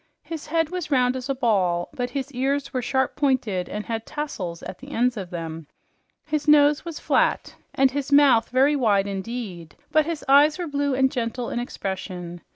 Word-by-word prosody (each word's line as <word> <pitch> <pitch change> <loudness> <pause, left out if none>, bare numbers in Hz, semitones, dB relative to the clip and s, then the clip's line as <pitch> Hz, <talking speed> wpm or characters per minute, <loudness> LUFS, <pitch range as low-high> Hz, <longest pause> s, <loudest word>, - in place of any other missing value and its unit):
His 325 -3 -7
head 325 0 +1
was 360 -4 -4
round 255 -3 +2
as 260 +1 -5
a 275 - 0
ball, 190 -9 +1
but 245 -1 -3
his 275 0 -4
ears 275 +2 -1
were 255 - 0
sharp 265 +2 0
pointed 240 - 0
and 210 0 -5
had 225 -1 -3
tassels 220 - -5
at - - -8
the 275 - -11
ends 250 -2 +1
of 190 -5 -6
them. 165 -3 -6 0.6
His 305 0 -2
nose 295 0 +5
was 335 -3 -6
flat, - - +1 0.2
and 265 -1 +4
his 285 +1 -3
mouth 280 -5 +5
very 270 +4 +3
wide 210 -7 +2
indeed, 195 -4 -6 0.2
but 310 0 +3
his 330 -3 -4
eyes 290 +3 +6
were 355 - -3
blue 285 -3 -1
and 265 0 +3
gentle 240 0 -3
in - - -2
expression. 185 -6 -5
255 Hz, 190 wpm, -24 LUFS, 205-285 Hz, 0.6 s, eyes